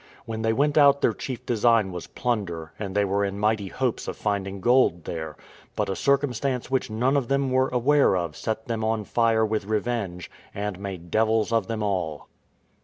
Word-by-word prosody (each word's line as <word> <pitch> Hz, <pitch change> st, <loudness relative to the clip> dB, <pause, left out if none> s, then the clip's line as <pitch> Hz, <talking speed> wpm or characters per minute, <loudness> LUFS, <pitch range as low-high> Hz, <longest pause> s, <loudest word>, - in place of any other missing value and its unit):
When 110 Hz, -1 st, -4 dB
they 110 Hz, 0 st, +2 dB
went 145 Hz, +6 st, +2 dB
out 140 Hz, -1 st, +6 dB
their -, -, +3 dB
chief 130 Hz, -3 st, -6 dB
design 115 Hz, -3 st, +3 dB
was 90 Hz, -1 st, -6 dB
plunder, 95 Hz, -10 st, -3 dB
and 100 Hz, -2 st, -5 dB
they 105 Hz, 0 st, +3 dB
were 100 Hz, +1 st, 0 dB
in 100 Hz, 0 st, -2 dB
mighty 105 Hz, -1 st, +1 dB
hopes 125 Hz, +4 st, -2 dB
of -, -, -4 dB
finding 100 Hz, -2 st, -2 dB
gold 120 Hz, -6 st, +3 dB
there; 80 Hz, -2 st, -5 dB, 0.4 s
but -, -, -1 dB
a -, -, -2 dB
circumstance 135 Hz, -1 st, 0 dB
which 130 Hz, -2 st, 0 dB
none 125 Hz, +6 st, +1 dB
of 135 Hz, -4 st, +1 dB
them 140 Hz, 0 st, +1 dB
were 130 Hz, +1 st, +3 dB
aware 125 Hz, -3 st, +3 dB
of 85 Hz, -4 st, -3 dB
set 110 Hz, +9 st, -3 dB
them 115 Hz, -2 st, -3 dB
on 110 Hz, 0 st, 0 dB
fire 115 Hz, +1 st, +2 dB
with 110 Hz, -2 st, -2 dB
revenge, 105 Hz, -4 st, -2 dB, 0.2 s
and 100 Hz, -2 st, -3 dB
made 95 Hz, -4 st, -7 dB
devils 110 Hz, 0 st, +2 dB
of 115 Hz, -4 st, +1 dB
them 110 Hz, -2 st, -3 dB
all. 90 Hz, -7 st, -2 dB
110 Hz, 190 wpm, -25 LUFS, 100-125 Hz, 0.4 s, out